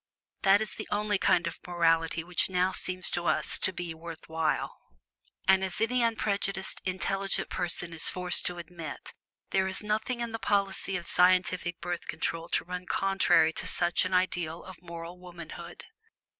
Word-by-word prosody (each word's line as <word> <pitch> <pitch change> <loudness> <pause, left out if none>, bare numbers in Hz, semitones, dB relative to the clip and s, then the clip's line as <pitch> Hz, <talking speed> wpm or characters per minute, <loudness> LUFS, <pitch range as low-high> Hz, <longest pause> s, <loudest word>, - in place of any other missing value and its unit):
That 195 +2 +5
is 220 - -2
the - - -7
only 210 -1 0
kind 170 -1 +3
of 170 - -4
morality 165 -2 +2
which 180 +2 +1
now 185 0 +2
seems 185 -1 -1
to 175 -1 -1
us - - +1
to - - +2
be 175 -2 -5
worth 165 0 -9
while. 160 -1 -1 0.7
And, 190 0 +5
as 190 -2 -3
any 245 +3 +2
unprejudiced 200 -4 0
intelligent 195 +1 -1
person 175 -1 0
is 160 - 0
forced 180 -1 0
to 180 - -4
admit, 170 -2 -8 0.4
there 190 0 +2
is 190 +2 +2
nothing 220 +4 -1
in 235 -1 -2
the 225 - -4
policy 195 -2 +1
of 170 - -8
scientific 180 -1 +3
Birth 175 0 -4
Control 165 +1 -3
to - - 0
run 180 0 -6
contrary 195 -4 +3
to - - -4
such 175 -1 +2
an 185 - -2
ideal 175 -3 0
of 185 -3 -11
moral 170 0 -8
womanhood. 175 -3 -9
180 Hz, 170 wpm, -29 LUFS, 170-195 Hz, 0.7 s, That